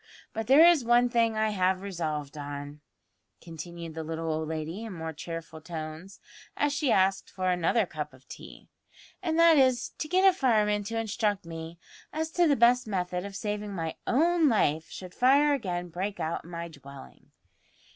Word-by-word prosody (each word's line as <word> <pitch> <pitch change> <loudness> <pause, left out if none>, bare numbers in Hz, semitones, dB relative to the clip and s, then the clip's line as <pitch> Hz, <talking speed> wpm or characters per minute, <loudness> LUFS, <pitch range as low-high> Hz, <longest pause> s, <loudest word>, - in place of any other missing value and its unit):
But 220 -1 -4
there 290 +5 +8
is 340 -6 +5
one 240 +1 +4
thing 230 -2 +1
I 215 0 +2
have 185 -1 +1
resolved 155 -7 -4
on," 145 0 -7 0.6
continued 170 0 -8
the 160 0 -5
little 160 0 -3
old 155 0 -3
lady 160 +6 -4
in 225 -3 -6
more 160 -2 -5
cheerful 160 0 -7
tones, 160 +3 -8 0.4
as 290 0 +1
she 285 -3 +1
asked 190 0 +2
for 185 -1 -1
another 180 +5 +2
cup 150 -3 -6
of 130 0 -20
tea, - - -12 0.5
"and 330 -3 -1
that 335 -2 +6
is, 255 -2 +2
to 305 - -3
get 370 +4 +4
a 380 - +6
fireman 215 - +2
to 225 +2 -3
instruct 215 -3 -1
me 165 0 -8 0.3
as 320 +1 -3
to 350 0 +3
the 285 - +4
best 240 0 +4
method 180 -2 -2
of 200 - -10
saving 210 0 -4
my 165 -2 -3
own 325 +4 +3
life 160 - +1
should 185 -1 -9
fire 280 +4 +4
again 180 -9 -3
break 190 +5 -4
out 160 +1 -3
in - - -12
my 170 -1 -5
dwelling." 140 - -14
190 Hz, 180 wpm, -28 LUFS, 160-240 Hz, 0.6 s, there